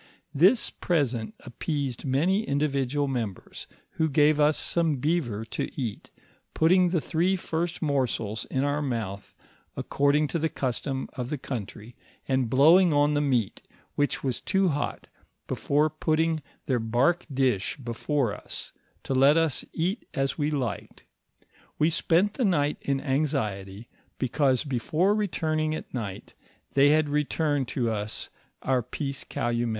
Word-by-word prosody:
This 190 - +4
present 125 - -1
ap 120 - -12
peased 140 -5 -2
many 160 +10 +2
individual 140 - 0
members, 115 -8 -5 0.2
who 160 0 0
gave 150 +1 +4
us 150 +1 +4
some 165 -3 +1
beaver 125 -7 -1
to 110 - -3
eat, 115 -6 -4 0.5
putting 180 +3 +4
the 175 -1 +1
three 175 +5 +1
first 170 -1 -3
morsels 125 -7 -1
in 130 - -1
our 145 +1 0
mouth 110 -8 -4 0.4
according 145 +2 +2
to 170 - -1
the 160 +1 0
custom 130 0 -3
of 125 -1 -4
the 150 - -2
country, 115 -2 -7 0.3
and 130 -3 +1
blowing 165 +8 +6
on 145 0 +3
the 145 - +2
meat 125 -8 0 0.3
which 145 0 -1
was 130 -4 -2
too 190 -1 +2
hot, 145 -1 -3 0.4
before 150 +2 +1
putting 160 +1 0 0.2
their 130 -3 +1
bark 120 +10 +1
dish 130 -7 0
before 125 -1 -1
us, - - -7 0.3
to - - -2
let 135 +4 +5
us 165 -4 +2
eat 185 +8 -2
as 135 0 0
we 150 -1 0
liked; 130 -9 -4 0.7
we 155 +2 +3
spent 180 +6 +2
the 255 - -1
night 150 -8 +2
in 140 -1 0
anxiety, 120 -8 -2 0.3
because 130 +1 +1
be 135 -5 -2
fore 175 - +2
retiring 155 -7 0
at - - -8
night, 105 -7 -5 0.4
they 140 +1 +5
had 155 0 +3
returned 145 -2 0
us 110 -4 -2 0.3
our 130 -2 +2
peace 135 +3 -4
calumet. 120 0 -1
140 Hz, 145 wpm, -27 LUFS, 125-155 Hz, 0.7 s, blowing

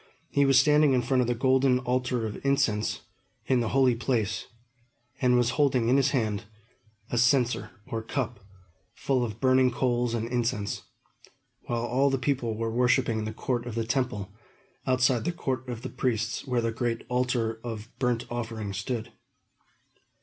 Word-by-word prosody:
He 140 0 +3
was 135 -2 +6
standing 150 0 +5
in 125 -1 +2
front 130 +1 +2
of 120 - 0
the 120 - +1
golden 130 +1 +3
altar 125 -2 -1
of 105 - -6
incense, 135 -6 +1 0.4
in 130 -2 +2
the 115 -2 0
Holy 130 -1 +4
Place, 115 -3 -1 0.7
and 125 -1 +4
was 120 0 +2
holding 130 -5 +2
in 130 - +5
his 135 0 +3
hand 110 -7 -1 0.7
a 120 - +1
censer, 125 0 +2 0.2
or 115 - -4
cup, 120 -1 -3 0.6
full 130 -3 0
of 110 -2 -5
burning 130 0 +4
coals 120 -1 0
and 115 0 -2
incense; 120 -3 -1 0.9
while 120 -1 -1
all 130 +4 +2
the 135 - +1
people 125 -4 -1
were 115 0 -2
worshipping 125 -1 +2
in 110 - -3
the 110 - -3
court 120 +2 -2
of 115 - -5
the 115 -1 -1
Temple, 110 -5 -2 0.5
outside 130 -2 +3
the 175 - 0
court 130 -6 -3
of 120 -1 -5
the - - -4
Priests, 115 -3 -2
where 125 -2 +1
the 115 0 0
great 115 0 -2
altar 125 -3 0
of 115 -1 -6
burnt 125 -2 0
offering 110 -4 -4
stood. 110 +4 -4
120 Hz, 170 wpm, -27 LUFS, 115-130 Hz, 0.9 s, was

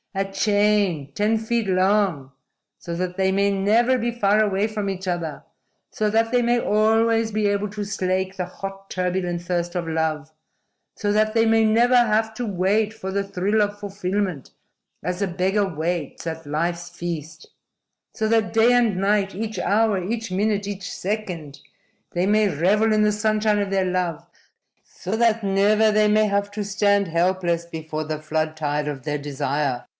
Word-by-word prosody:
A 195 0 -1
chain, 205 -6 +1
ten 215 +5 +1
feet 225 0 -1
long, 185 -7 +1 0.5
so 170 - -6
that 180 +1 -3
they 190 0 +1
may 200 +1 +2
never 220 +6 +2
be 240 0 -1
far 215 -2 +2
away 200 0 +1
from 210 -2 -3
each 190 -1 -5
other, 170 -5 -3 0.5
so 215 -3 0
that 225 +1 +1
they 245 -1 +3
may 240 0 +2
always 225 +1 +2
be 215 0 +1
able 205 0 0
to 210 0 -5
slake 190 -1 -2
the 185 - -2
hot, 195 +1 -8
turbulent 180 -1 -2
thirst 175 0 -2
of 175 -2 -3
love, 160 -1 -2 0.7
so 205 -1 0
that 215 +1 +2
they 225 0 +3
may 225 0 +4
never 235 +3 +4
have 220 -2 +3
to 240 +2 -4
wait 205 +2 +1
for 190 -4 -6
the 200 +1 0
thrill 200 +2 0
of 205 0 -1
fulfillment 195 -5 -3 0.5
as 180 +4 -3
a 200 - +1
beggar 190 +3 0
waits 170 -2 -3
at 165 0 -5
life's 170 +3 -2
feast, 165 -2 -6 0.7
so 220 -2 -1
that 225 -1 +2
day 225 +2 +4
and 235 -6 +2
night, 195 0 +1
each 220 +3 -4
hour, 210 -3 +1
each 225 +3 -3
minute, 200 +1 0
each 195 -2 -5
second 180 -8 -4 0.5
they 175 +1 +1
may 210 +1 +3
revel 200 +8 +2
in 215 0 +3
the 210 0 +3
sunshine 215 0 +1
of 200 -1 -1
their 195 -1 +1
love, 180 -3 -2 0.6
so 190 +4 -5
that 230 -1 +2
never 205 +2 +3
they 215 0 +3
may 215 +1 +4
have 200 0 0
to 205 0 -4
stand 200 0 +2
helpless 170 0 0
before 160 -2 -5
the 155 0 -4
flood 155 0 -2
tide 150 -1 -1
of 135 -3 -6
their 150 +1 -2
desire. 140 -2 -2
195 Hz, 175 wpm, -23 LUFS, 175-215 Hz, 0.7 s, may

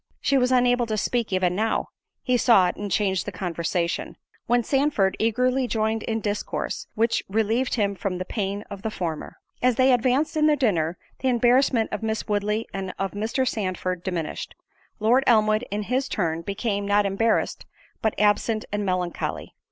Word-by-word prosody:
She 275 - +1
was 250 -1 +3
unable 245 -1 +3
to 215 -1 -1
speak 235 +1 -1
even 185 -1 +1
now—he 225 +4 -2
saw 230 -6 +5
it, - - -5
and 205 0 -5
changed 190 -1 0
the - - -2
conversation; 170 -1 -2 0.3
when 240 0 +3
Sandford 270 -8 +1
eagerly 250 +3 +1
joined 220 -1 0
in 225 0 -2
discourse, 205 0 -3
which 230 +1 +1
relieved 225 +5 +1
him 205 -4 +1
from 185 -1 -3
the 185 - -4
pain 200 0 -3
of 200 -1 -7
the 220 - -2
former. 170 -7 -5 0.2
As 250 -1 +3
they 260 +2 +4
advanced 255 +6 +1
in 305 0 +3
their 305 - +4
dinner, 180 - 0 0.2
the 265 - -1
embarrassment 245 -1 +3
of - - -3
Miss 220 0 -2
Woodley 210 +1 -1
and 190 -1 -4
of 195 0 -2
Mr. 225 +5 -1
Sandford 185 -4 -2
diminished; 170 -5 -4 0.4
Lord 235 +5 +4
Elmwood 215 0 +4
in 210 +1 -2
his 255 +5 -1
turn 165 -4 -1
became, 200 +2 -2
not 205 0 +3
embarrassed, 215 +3 0 0.3
but 220 - 0
absent 210 +1 +2
and 205 0 -1
melancholy. 180 -2 -2
215 Hz, 170 wpm, -24 LUFS, 195-245 Hz, 0.4 s, saw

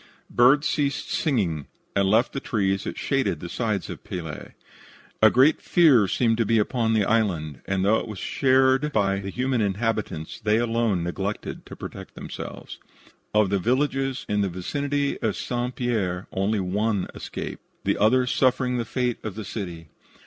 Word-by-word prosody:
Birds 135 +5 +5
ceased 140 -1 -1
singing 95 - 0 0.3
and 100 -1 +3
left 110 +4 +3
the 135 - -2
trees 100 -6 -1
that - - -5
shaded - - 0
the - - -6
sides - - -2
of - - -8
Pelee. 80 -4 -6 0.7
A 110 - +8
great 135 +7 +4
fear 140 - +5
seemed 115 +2 +1
to 115 - +3
be 115 +2 +3
upon 110 +1 +1
the 105 -2 +3
island, 90 - 0
and 95 -1 0
though 110 +2 +4
it - - -6
was 105 -3 -7
shared 130 +6 +2
by 100 -5 +1
the 100 0 -5
human 125 +2 0
inhabitants, 105 -5 -2
they 105 0 +2
alone 115 -6 +1
neglected 95 +4 -4
to - - -9
protect - - -9
themselves. - - -8 0.6
Of 105 -2 +4
the 100 - +2
villages 135 +4 0
in 105 0 +1
the 100 - +1
vicinity 140 +10 -2
of - - 0
St. 125 0 -3
Pierre 100 -7 -1
only 100 +3 0
one 100 +2 0
escaped, - - -6 0.2
the - - 0
others 125 +4 +3
suffering 130 -1 +2
the 115 - -2
fate 125 0 -1
of 105 -4 -5
the 110 -1 -6
city. 85 -6 -6
110 Hz, 170 wpm, -25 LUFS, 95-125 Hz, 0.7 s, A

